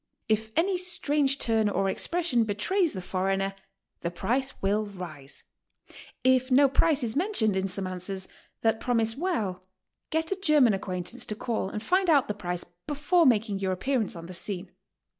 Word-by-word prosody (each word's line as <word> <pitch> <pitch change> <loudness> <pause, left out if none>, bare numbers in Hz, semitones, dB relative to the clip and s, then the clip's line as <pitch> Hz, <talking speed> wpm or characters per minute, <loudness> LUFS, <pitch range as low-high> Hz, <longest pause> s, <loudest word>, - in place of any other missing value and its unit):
If 220 0 0
any 365 +3 +2
strange 300 -6 +1
turn 220 -4 +2
or 195 0 0
expression 305 - +1
be 205 -2 -2
trays 365 - +1
the 185 -2 -5
foreigner, 195 +1 -1 0.5
the 170 - -2
price 255 +10 -2
will 210 +2 0
rise; 165 -8 -8 0.8
If 260 0 +3
no 275 +2 +6
price 280 +1 +2
is 225 -2 -1
men 380 +9 0
tioned 215 - +2
in 190 0 0
some 190 +1 -3
answers 185 +1 -4 0.3
that 225 -1 +2
promise 225 -2 +1
well, 225 - -2 0.5
get 320 +2 -1
a - - +2
German 295 - +5
ac 195 - -1
quaintance 185 +6 -4
to 210 - -3
call 220 -3 -2
and 210 +2 -5
find 370 +4 +2
out 290 -5 +5
the 210 - -1
price 180 -4 -3 0.2
before 300 +3 +3
making 215 -4 +2
your 190 -1 0
appearance 225 +2 0
on 170 0 -8
the 185 - -8
scene. 180 0 -1
220 Hz, 180 wpm, -27 LUFS, 195-280 Hz, 0.8 s, no